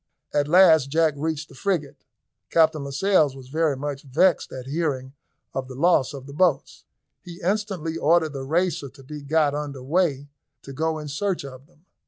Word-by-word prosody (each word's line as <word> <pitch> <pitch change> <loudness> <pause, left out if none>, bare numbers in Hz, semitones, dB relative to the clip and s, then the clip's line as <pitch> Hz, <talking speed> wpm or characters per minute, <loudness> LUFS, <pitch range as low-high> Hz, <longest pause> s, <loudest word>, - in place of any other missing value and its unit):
At 145 -1 +1
last 160 -4 +6
Jack 160 +1 +2
reached 155 +1 -3
the - - -16
frigate. 160 -1 -3 0.4
Captain 160 -3 +3
Lascelles 145 0 +2
was 130 -2 -12
very 155 -1 0
much 140 0 -4
vexed 165 +7 +2
at 130 -1 -7
hearing 135 -3 -2 0.4
of 130 -1 -3
the 130 - -9
loss 155 -2 +3
of 135 -2 -9
the 140 - -10
boats. 155 -3 0 0.4
He 175 -1 -11
instantly 185 -4 -1
ordered 160 0 +2
the 135 - -5
Racer 160 0 0
to 135 +1 -17
be 150 +2 -8
got 145 0 +1
under 145 -3 -5
weigh 145 -2 0 0.4
to 135 - -9
go 160 +3 -1
in 150 -1 -7
search 175 +2 -2
of 130 0 -11
them. 170 0 -30
150 Hz, 180 wpm, -24 LUFS, 140-165 Hz, 0.4 s, last